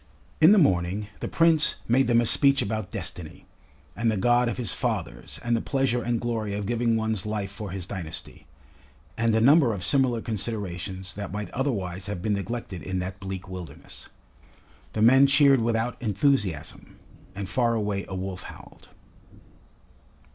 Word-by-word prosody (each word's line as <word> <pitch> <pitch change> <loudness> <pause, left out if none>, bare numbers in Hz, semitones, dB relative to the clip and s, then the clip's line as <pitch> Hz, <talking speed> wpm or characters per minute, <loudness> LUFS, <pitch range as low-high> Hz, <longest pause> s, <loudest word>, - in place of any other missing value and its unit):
In 160 +4 +8
the 210 - +6
morning 95 - +2
the - - -4
Prince 165 -2 +3
made 130 +3 +3
them 120 -1 +4
a - - 0
speech 140 +4 +3
about 110 0 -3
Destiny, 80 -3 -7 0.5
and 115 +1 +1
the 110 - -1
God 120 +4 +3
of - - -4
his 120 -7 -1
Fathers 60 +1 -4
and 120 0 +1
the 115 - 0
pleasure 135 -3 0
and 120 0 -1
glory 110 -4 -2
of 105 0 -3
giving 115 +1 +1
one's 110 -3 0
life 105 -2 -3
for 105 0 -7
his 90 -1 -5
dynasty, 85 -4 -7 0.7
and 115 -1 +1
a - - +4
number 130 -1 +5
of 90 - -5
similar 125 +2 +2
considerations 100 -4 -4
that 100 -1 -6
might 105 +1 -5
otherwise 95 -8 -2
have 100 -4 -5
been 105 - +1
neglected 100 -3 -4
in 95 0 -3
that 95 +1 -4
bleak 95 -1 -6
wilderness. 90 -6 -10 0.8
The 110 - +1
men 135 +4 +7
cheered 140 -2 +5
without 115 +2 -1
enthusiasm, 105 - -1 0.4
and 100 0 -4
far 115 +3 +1
away 105 -2 -2
a 95 - -4
wolf 95 0 -5
howled. - - -13
110 Hz, 165 wpm, -26 LUFS, 95-120 Hz, 0.8 s, In